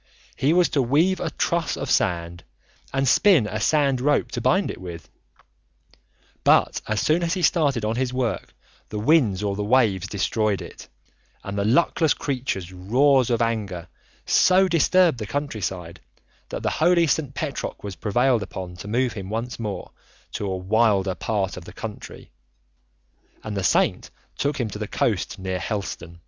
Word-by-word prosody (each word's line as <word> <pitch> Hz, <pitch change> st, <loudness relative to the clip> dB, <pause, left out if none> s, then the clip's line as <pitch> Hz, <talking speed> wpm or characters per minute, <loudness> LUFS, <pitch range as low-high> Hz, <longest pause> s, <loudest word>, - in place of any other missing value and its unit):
He 140 Hz, -, +1 dB
was 175 Hz, +1 st, +4 dB
to 140 Hz, -, +1 dB
weave 155 Hz, +10 st, +2 dB
a 170 Hz, -, -2 dB
truss 170 Hz, 0 st, -1 dB
of 135 Hz, -, -3 dB
sand 85 Hz, -6 st, 0 dB, 0.5 s
and 135 Hz, 0 st, 0 dB
spin 175 Hz, -, +5 dB
a 105 Hz, +1 st, -3 dB
sand 140 Hz, +1 st, +2 dB
rope 145 Hz, +2 st, +1 dB
to -, -, -3 dB
bind 190 Hz, +2 st, +2 dB
it -, -, -10 dB
with. 85 Hz, -4 st, -8 dB, 1.4 s
But -, -, +3 dB
as 110 Hz, 0 st, 0 dB
soon 155 Hz, -, +2 dB
as 170 Hz, +2 st, 0 dB
he 180 Hz, -, -3 dB
started 140 Hz, -11 st, +2 dB
on 110 Hz, +2 st, -1 dB
his 130 Hz, -1 st, 0 dB
work 125 Hz, -6 st, -3 dB, 0.3 s
the 105 Hz, -, -5 dB
winds 110 Hz, -, +3 dB
or 100 Hz, -1 st, -1 dB
the 105 Hz, -, -2 dB
waves 105 Hz, -5 st, +2 dB
destroyed 105 Hz, 0 st, 0 dB
it, -, -, -10 dB, 0.6 s
and 100 Hz, -, -5 dB
the 100 Hz, -, 0 dB
luckless 145 Hz, -, +2 dB
creature's 120 Hz, -, -3 dB
roars 125 Hz, +8 st, +3 dB
of 120 Hz, -1 st, +2 dB
anger 100 Hz, -7 st, -3 dB, 0.4 s
so 185 Hz, +1 st, +4 dB
disturbed 175 Hz, -3 st, +3 dB
the 105 Hz, -, -5 dB
countryside 95 Hz, -, -4 dB, 0.5 s
that -, -, -5 dB
the -, -, 0 dB
holy 175 Hz, -1 st, +3 dB
St. 145 Hz, -3 st, -1 dB
Petroc 145 Hz, -2 st, -4 dB
was 100 Hz, -2 st, -6 dB
prevailed 120 Hz, +6 st, +1 dB
upon 95 Hz, -2 st, -7 dB
to 100 Hz, -, -9 dB
move 125 Hz, +3 st, 0 dB
him 95 Hz, -2 st, -7 dB
once 115 Hz, +3 st, -4 dB
more, 105 Hz, -4 st, -5 dB, 0.4 s
to 100 Hz, -, -4 dB
a 95 Hz, -1 st, -2 dB
wilder 100 Hz, 0 st, +2 dB
part 100 Hz, -2 st, -2 dB
of 90 Hz, -, -9 dB
the -, -, -11 dB
country, -, -, -9 dB, 1.1 s
and 105 Hz, -1 st, -5 dB
the 100 Hz, -, -2 dB
saint -, -, +1 dB, 0.3 s
took 145 Hz, 0 st, -1 dB
him 120 Hz, -, 0 dB
to -, -, -7 dB
the -, -, -3 dB
coast -, -, -1 dB
near 95 Hz, -1 st, -3 dB
Helston. 90 Hz, -3 st, -5 dB
115 Hz, 170 wpm, -23 LUFS, 100-140 Hz, 1.4 s, spin